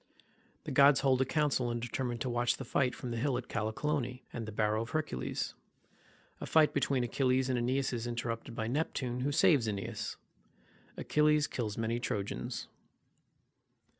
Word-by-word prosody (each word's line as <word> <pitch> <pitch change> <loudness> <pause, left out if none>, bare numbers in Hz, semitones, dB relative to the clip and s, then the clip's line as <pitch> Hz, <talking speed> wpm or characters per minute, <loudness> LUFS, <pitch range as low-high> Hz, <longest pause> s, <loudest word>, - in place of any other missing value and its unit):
The - - -5
gods 140 0 +6
hold 135 -2 +3
a - - +3
council 135 -3 +1
and 120 0 -2
determine 120 +1 -3
to 130 - -3
watch 120 0 +1
the 135 - -6
fight, 125 +1 +1
from 125 - -6
the 115 - -2
hill 125 +1 0
Callicolone, 125 +3 -2
and 115 -2 -4
the - - -5
barrow 105 +1 +1
of 115 - -5
Hercules—A 145 - -6
fight 155 -1 +4
between 135 -2 +1
Achilles 130 +1 +1
and 125 - +1
AEneas 130 +2 0
is 120 0 -3
interrupted 115 -1 -4
by 110 - -2
Neptune, 125 -1 -1
who 135 +3 0
saves 145 -7 +4
AEneas—Achilles 150 - -2
kills 110 -7 -3
many 115 +1 -1
Trojans. 100 -4 -3
125 Hz, 150 wpm, -32 LUFS, 115-140 Hz, -, gods